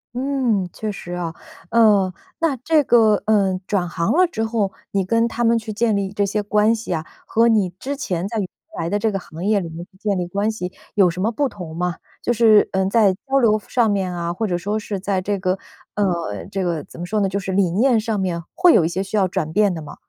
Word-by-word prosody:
嗯， 255 -7 0
确 215 -1 -4
实 175 -3 -8
啊。 175 -2 -3 0.4
呃， 205 -5 +4 0.3
那 325 -5 +1
这 305 +5 +2
个， 225 -4 +5
呃， 200 -4 +3
转 190 -4 0
行 170 -1 -1
了 365 +4 +4
之 225 -10 -3
后 220 -4 -1 0.2
你 195 -2 0
跟 230 +4 +2
他 235 0 -2
们 230 0 +4
去 220 -1 -5
建 220 0 +1
立 195 -1 -1
这 205 0 0
些 205 +1 -1
关 210 +2 +3
系 220 -5 -4
啊， 160 0 -3 0.2
和 230 +1 +3
你 215 -5 +3
之 280 +2 -3
前 185 - -2
在 225 +2 -4
原 195 - -2 0.3
来 165 0 -2
的 205 +3 0
这 220 +1 +1
个 195 - -2
行 170 -1 -8
业 205 -1 +2
里 170 - -6
面 165 +2 -8
去 190 0 -26
建 200 0 -1
立 175 - -2
关 200 +4 0
系 180 -4 -5 0.2
有 195 -4 +5
什 180 +2 -4
么 225 +3 +1
不 285 +4 0
同 180 -9 -8
吗？ 180 -1 -1 0.3
就 240 - +1
是， 220 -2 +5
嗯， 190 0 +1
在 200 -3 +4
交 275 0 +2
流 220 -4 +4
上 240 -3 +2
面 190 -3 -1
啊， 170 -1 -3
或 220 +5 -2
者 180 -4 0
说 205 +5 -2
是 210 -2 -4
在 190 -1 -1
这 200 +1 -2
个 185 0 0 0.4
呃， 170 - -1
这 195 - -2
个 170 -5 -1
怎 - - -14
么 175 - -4
说 210 +3 -1
呢， 195 - +1
就 200 +1 -2
是 190 -1 -4
理 185 -3 +2
念 240 +6 +3
上 220 -1 -1
面， 175 -3 -2
会 360 -1 +5
有 - - +5
一 160 - +1
些 185 +2 -2
需 195 +2 -4
要 190 -3 +2
转 160 -2 -2
变 205 0 +3
的 160 - -5
吗？ 150 - -9
200 Hz, 270 characters per minute, -21 LUFS, 180-220 Hz, 0.4 s, 个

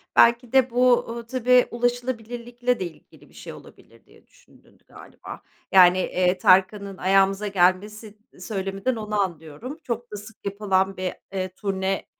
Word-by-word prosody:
Belki 235 0 +4
de 260 -1 +4
bu, 250 0 +3
ııı, 235 0 -6
tabii, 250 0 +3
ulaşılabilirlikle 245 0 -2
de 185 - -2
ilgili 165 -3 -14
bir - - -24
şey - - -10
olabilir - - -17
diye - - -23
düşündün - - -25
galiba. - - -12 0.3
Yani, 180 -1 +7
eee, 180 0 0
Tarkan'ın 195 +2 +2
ayağımıza 195 +2 +2
gelmesi 205 +3 0 0.2
söyleminden 195 +3 -3
onu 210 -1 -3
anlıyorum. 175 - -6
Çok 240 0 -5
da 210 - -6
sık 210 +1 -14
yapılan 195 -1 0
bir, 185 -1 -3 0.2
eee, 185 -1 -3
turne, 195 -1 -2
210 Hz, 145 wpm, -23 LUFS, 190-240 Hz, 0.3 s, Yani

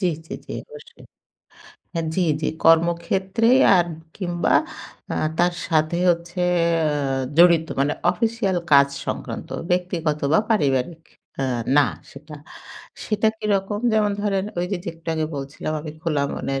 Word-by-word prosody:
জ্বী, 185 - +2 0.2
জ্বী, - - -7
জ্বী, - - -7
অবশ্যই। 465 -1 -14 0.9
হ্যাঁ, 165 -2 -2
জ্বী, 185 - +1 0.2
জ্বী, 155 - 0 0.2
কর্মক্ষেত্রেই 190 +8 +3 0.2
আর 175 -1 +3 0.3
কিংবা 175 -3 0 0.6
আ - - -2 0.2
তার 175 0 +3
সাথে 155 +1 +1
হচ্ছে 175 +1 -2 0.4
আ - - +1 0.5
জড়িত 170 -2 +6
মানে 145 +2 +2 0.2
অফিসিয়াল 220 -1 -1 0.2
কাজ 140 0 +7 0.2
সংক্রান্ত। - - -5 0.2
ব্যক্তিগত 175 -4 0
বা - - +5
পারিবারিক 155 - +1 0.4
আ - - +1 0.3
না 145 - +6 0.2
সেটা। 150 +2 -11 0.7
সেটা 215 0 +1
কিরকম? 205 -1 -1
যেমন 210 -2 +2
ধরেন 195 -2 0
ঐযে, 180 +3 -1
যে - - -4
একটু 165 0 -12
আগে 155 -1 -1
বলছিলাম, 140 +3 -5
আমি 155 0 -7
খোলা 150 -4 0
মনের 135 0 -3
170 Hz, 135 wpm, -22 LUFS, 155-195 Hz, 0.9 s, কাজ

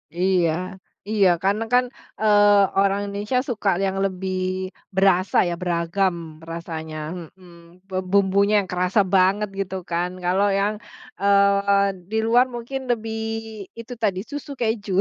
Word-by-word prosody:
Iya, 180 -2 +2 0.6
iya. 205 -3 +4 0.2
Karena 205 +3 +1
kan, 250 0 +5 0.4
eee, 205 -2 +5
orang 195 0 +2
Indonesia 205 +5 -1
suka 215 -4 0 0.2
yang 190 0 -2
lebih 185 0 -3 0.6
berasa 190 -1 +3
ya, 175 - -1
beragam 175 +1 0 0.4
rasanya, 160 -2 -6 0.4
mhm. 175 -1 -18 0.3
Bumbunya 200 +1 +3
yang 185 - -12
kerasa 180 +3 +2
banget 195 +3 +3
gitu 190 -1 -3
kan. 175 +1 0
Kalau 190 +3 +2
yang, 205 +2 +1 0.5
eee, 200 0 +4 0.2
di 220 - -1
luar 240 +3 +5
mungkin 240 +3 -5
lebih 225 -1 -2 0.6
itu 230 +2 -7
tadi 195 -3 +1
susu 290 0 -6
keju. 220 -3 -1
200 Hz, 130 wpm, -23 LUFS, 185-210 Hz, 0.6 s, kan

